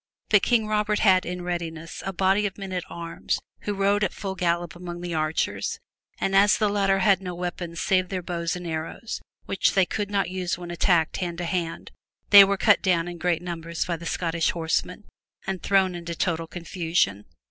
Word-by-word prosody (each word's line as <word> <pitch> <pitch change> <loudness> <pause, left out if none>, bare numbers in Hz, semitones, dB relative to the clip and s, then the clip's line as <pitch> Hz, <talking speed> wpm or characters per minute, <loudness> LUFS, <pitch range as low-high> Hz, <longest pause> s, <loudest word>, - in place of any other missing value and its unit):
But 210 -2 +6
King 230 -1 +2
Robert 210 0 +1
had 190 -4 +4
in 180 0 -4
readiness 165 -2 -4
a 195 - -2
body 195 +3 +2
of 195 - -9
men 195 -2 -6
at 180 -2 -2
arms 170 -1 -3 0.2
who 205 - -3
rode 200 +1 +2
at 200 - +1
full 195 -2 -4
gallop 175 -2 -1
among 175 0 -7
the 175 -1 -4
archers 155 0 -1 0.4
and 195 - 0
as 200 +1 +6
the 210 -2 +2
latter 195 -1 +2
had 195 -2 +4
no 180 -2 -5
weapons 175 -1 -5
save 185 -1 +1
their 185 -2 -3
bows 170 -1 -2
and 180 0 -7
arrows 165 +7 -4 0.2
which 195 - +1
they 190 -2 +5
could 205 +2 -3
not 200 -1 +1
use 185 -2 -2
when 175 -1 -7
attacked 170 -1 +2
hand 175 -2 -3
to 175 - -3
hand, 170 -2 -3 0.4
they 200 -1 +12
were 200 0 +1
cut 210 +1 +4
down 175 -3 +2
in 175 -1 -7
great 175 -1 0
numbers 170 -1 -3
by 175 - -1
the 170 0 -7
Scottish 165 -1 0
horsemen 170 +4 -1 0.4
and 190 -2 -3
thrown 190 -2 +3
into 170 -1 -5
total 165 -2 -1
confusion. 165 - -1
180 Hz, 200 wpm, -25 LUFS, 170-195 Hz, 0.4 s, they